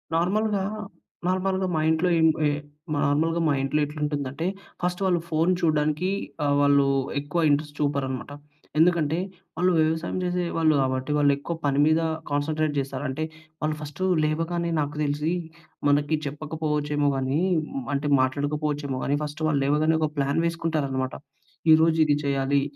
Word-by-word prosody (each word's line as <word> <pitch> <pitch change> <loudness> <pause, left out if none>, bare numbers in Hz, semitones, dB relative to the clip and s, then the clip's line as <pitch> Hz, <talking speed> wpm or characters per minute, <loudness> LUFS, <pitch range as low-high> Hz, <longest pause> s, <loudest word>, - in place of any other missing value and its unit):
నార్మల్‍గా, 200 +4 +1 0.7
నార్మల్‍గా 185 0 0
మా 155 - +1
ఇంట్లో 160 +3 +2
ఏంట్ 160 -1 +4
వె 150 - +3 0.6
నార్మల్‍గా 160 +4 +1
మా 150 - +3
ఇంట్లో 150 +3 0
ఎట్లుంటుందంటే, 145 0 -3 0.4
ఫస్ట్ 180 +1 -1
వాళ్ళు 180 -2 +2
ఫోన్ 160 +3 +2
చూడడానికి 155 +2 +1 0.3
ఆహ్, 145 -1 +2
వాళ్ళు 140 -1 +4 0.3
ఎక్కువ 150 +4 -2
ఇంట్రెస్ట్ 145 +1 0
చూపరనమాట. 140 -2 -1 0.5
ఎందుకంటే, 165 -2 +3 0.4
వాళ్ళు 180 +1 +3
వ్యవసాయం 160 +3 0
జేసేవాళ్ళు 170 -3 +1
కాబట్టి 130 +2 -1
వాళ్ళెక్కువ 145 +3 +1
పని 140 0 +2
మీద 155 +1 +3 0.3
కాన్సంట్రేట్ 155 +1 0
జేస్తారు. 135 +1 -3
అంటే, 145 +4 -3 0.4
వాళ్ళు 155 0 0
ఫస్ట్ 150 +2 -8 0.2
లేవగానే 165 +2 -1
నాకు 145 0 -3
దెలిసి 150 +3 0 0.6
మనకి 145 +2 +2
చెప్పకపోవచ్చేమో 150 0 -1
గానీ, 135 +2 0 0.6
అంటే 145 +1 -1
మాట్లాడకపోవచ్చేమో 145 0 -1
గానీ 145 +1 +1
ఫస్ట్ 150 +2 -5
వాళ్ళు 145 -3 +1
లేవగానే, 155 +3 +2
ఒక 155 - +1
ప్లాన్ 140 +2 +1
వేసుకుంటారనమాట. 155 -6 -1 0.6
ఈరోజు 160 +1 +4
ఇది 145 - +3
చేయాలి, 140 0 +1
150 Hz, 130 wpm, -25 LUFS, 145-160 Hz, 0.7 s, ఏంట్